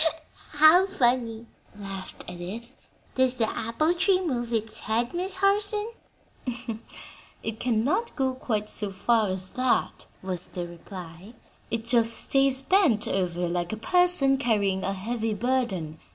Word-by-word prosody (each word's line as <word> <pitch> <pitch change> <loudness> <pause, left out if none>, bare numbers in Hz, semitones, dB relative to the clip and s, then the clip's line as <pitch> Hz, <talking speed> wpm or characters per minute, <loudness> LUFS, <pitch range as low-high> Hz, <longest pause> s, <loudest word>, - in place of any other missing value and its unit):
'" - - -24
"How 310 +5 +7
funny!" 240 - 0 0.3
laughed 195 -2 -7
Edith. 185 +7 -7 0.4
"Does 260 -1 +2
the 230 -3 +1
apple 235 +11 0
tree 370 +1 +3
move 245 -10 -2
its 220 -1 -2
head, 235 +3 -1
Miss 365 +2 -1
Harson?" 410 +3 +1 1.5
"It 220 -1 -4
cannot 250 - 0
go 265 -2 0
quite 215 -5 -2
so 210 -2 -3
far 215 +2 +2
as 185 0 -2
that," 255 -1 0 0.2
was 185 -2 -2
the 175 -1 -5
reply; 175 +3 -10 0.3
"it 230 -1 -2
just 230 -1 +4
stays 270 -1 +3
bent 285 - +3
over 180 -2 -1
like 175 0 -2
a 220 - -3
person 325 +1 +3
carrying 205 -7 +1
a 195 - -1
heavy 220 +2 -2
burden. 205 -10 -1
230 Hz, 135 wpm, -26 LUFS, 195-270 Hz, 1.5 s, How